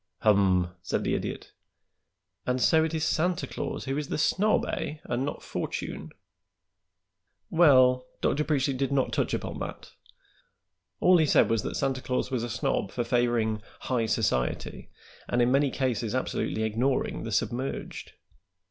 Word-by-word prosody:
"Hum!" 95 -4 +3
said - - -2
the - - 0
Idiot. - - -4 1.0
"And 125 0 +1
so 160 +5 +4
it 160 - -1
is 155 - -1
Santa 175 +3 +1
Claus - - -5
who 135 0 -2
is 150 - -4
the - - -2
snob, 205 +7 +2
eh, 150 - -3
and 120 +2 -2
not 145 - -4
Fortune?" 75 +2 -4 1.4
"Well, 130 -6 +5
Dr. 150 - +1
Preachly 140 -3 0
did 135 +1 -1
not 135 -2 +1
touch - - 0
upon - - -5
that. - - -7 1.1
All 180 0 +6
he 155 - +3
said - - +4
was 115 -2 +2
that - - -4
Santa 135 -2 -1
Claus 125 +1 -2
was 125 -3 -1
a 120 - -3
snob 110 -3 -1
for 120 - -2
favoring 115 -3 +1 0.2
'high 120 -3 0
society' 80 - -1 0.4
and 120 - +1
in 120 +1 +3
many 140 +1 +3
cases 125 -4 -1
absolutely 120 -3 -1
ignoring 120 +5 0
the 115 - -5
submerged." 125 +5 -3
125 Hz, 155 wpm, -27 LUFS, 115-140 Hz, 1.4 s, All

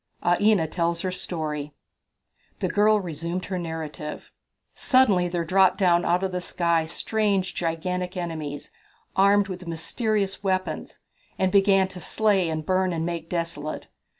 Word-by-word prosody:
Aina 185 +1 +4
Tells 170 +1 -1
Her 185 - -2
Story. 150 -5 -4 0.8
The - - -1
girl 210 +1 +4
resumed 170 0 -4
her 185 -1 -3
narrative: 160 -2 -6 0.4
"Suddenly 215 -10 +4
there 175 -1 -2
dropped 190 +2 +4
down 175 -2 +3
out 175 +2 +2
of 190 - -1
the 180 0 -2
sky 170 -2 0
strange 200 0 0
gigantic 180 +2 -2
enemies, 155 -5 -5 0.4
armed 200 +1 +4
with 180 -2 -7
mysterious 200 +4 -1
weapons, 185 -1 -2 0.4
and 190 -1 +1
began 195 -1 +4
to 185 -1 -6
slay 200 -3 +2
and 155 -1 -3
burn 185 0 +1
and 165 -1 -2
make 170 -1 -4
desolate. 165 -3 -4
180 Hz, 140 wpm, -25 LUFS, 165-195 Hz, 0.8 s, Aina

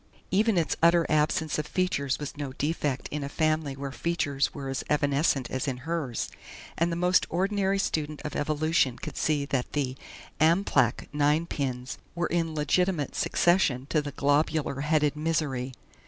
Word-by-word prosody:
Even 210 +1 +3
its 165 - +1
utter 170 0 +5
absence 155 0 +1
of 150 - -3
features 140 -8 0
was 145 -2 -6
no 145 -3 -5
defect 145 -3 -1
in 150 -1 -3
a 140 - -4
family 155 -2 0
where 135 0 -5
features 145 -3 0
were 140 -2 -6
as 135 0 -3
evanescent 145 -3 +1
as 130 +2 -2
in 130 -2 -1
hers, 160 -8 -2 0.4
and 170 +1 +1
the - - -1
most 180 +2 +3
ordinary 195 +2 +1
student 155 -6 -1
of 150 - -4
evolution 150 -3 +1
could - - -7
see 150 -2 +1
that 135 -3 -2
the 135 -3 -1 0.4
"Amplach" 155 - +3
ninepins 145 -4 0 0.2
were 175 0 0
in 165 -2 -1
legitimate 155 0 +1
succession 160 -8 +2
to 155 - +3
the 145 -1 -5
globular 145 0 +1
headed 150 -1 +2
"Misery." 150 -5 -1
150 Hz, 155 wpm, -28 LUFS, 140-165 Hz, 0.4 s, utter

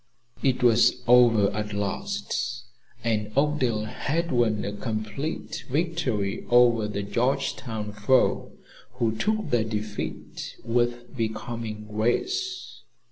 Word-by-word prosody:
It 130 -2 +1
was 120 +1 +4
over 120 -4 +6
at 105 0 -3
last, 120 - -2 0.4
and 105 -2 0
Oakdale 130 -7 +2
had 165 +9 -2
won 115 -4 +2
a 100 - -3
complete 110 +7 -4
victory 140 - -1
over 120 -3 +5
the 100 -1 -3
Georgetown 115 0 -1
foe, 105 +5 +2 0.4
who 115 -2 0
took 215 - -1
their 120 -2 +3
defeat 105 -1 -5
with 120 +1 0
becoming 110 -1 -4
grace. 365 - -1
115 Hz, 105 wpm, -26 LUFS, 105-130 Hz, 0.4 s, over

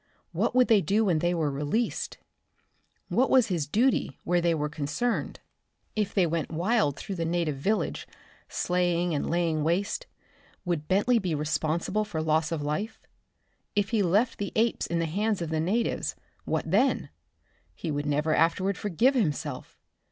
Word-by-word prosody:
What - - 0
would 255 -1 +5
they 220 -4 +5
do 205 +7 +2
when 175 -5 +2
they 175 +2 +1
were 155 -4 0
released? 150 +12 -2 0.9
What 240 +9 +2
was 255 -4 +4
his 165 -6 -1
duty 225 - +1
where 175 0 +2
they 170 -1 +2
were 150 -1 -1
concerned? 150 +11 -2 0.5
If 210 -2 0
they 190 -3 +4
went 165 -1 -1
wild 170 - +1
through 200 - -5
the 165 - -1
native 165 -3 -1
village, 205 +10 -1 0.4
slaying 175 -1 0
and 145 - -1
laying 165 -3 +1
waste, 195 - -1 0.6
would 165 -4 -2
Bentley 210 +6 +3
be 180 -6 -1
responsible 155 +7 0
for 205 -7 -4
loss 155 +1 +1
of 160 -3 -2
life? 195 +10 -3 0.8
If 205 -1 +1
he 225 -3 +2
left 205 +6 +2
the 205 - -3
apes 230 +1 +1
in 170 - -1
the 165 - +1
hands 205 +6 0
of 170 -2 -3
the 160 - 0
natives, 210 +9 0 0.3
what - - -2
then? - - +2 0.7
He 165 - -4
would 145 0 -2
never 150 +2 +1
afterward 185 +5 +2
forgive 210 - +2
himself. 150 - -2
175 Hz, 165 wpm, -27 LUFS, 155-210 Hz, 0.9 s, would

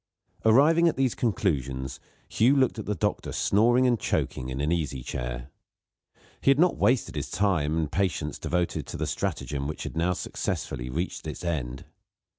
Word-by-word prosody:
Arriving 150 +9 +6
at 165 - +2
these 130 -3 +1
conclusions, 70 - -1 0.3
Hugh 125 +5 +3
looked 130 -4 +2
at 110 - -6
the 105 - 0
doctor 105 0 -1
snoring 120 +5 +3
and 120 -3 +3
choking 65 0 -1
in 65 +1 -4
an 75 +3 0
easy 75 -7 -1
chair. - - -5 0.9
He - - +3
had 135 - +6
not 175 +3 +4
wasted 125 -1 +2
the - - -2
time 80 -7 0
and 80 -3 -1
patience 80 -4 -1
devoted 90 0 -1
to - - -6
the - - -1
stratagem 70 -1 -2
which 75 - -5
had - - -6
now 85 +3 +1
successfully 60 -7 -3
reached 85 +8 -3
its - - -6
end. 65 -7 -3
85 Hz, 170 wpm, -27 LUFS, 70-115 Hz, 0.9 s, Arriving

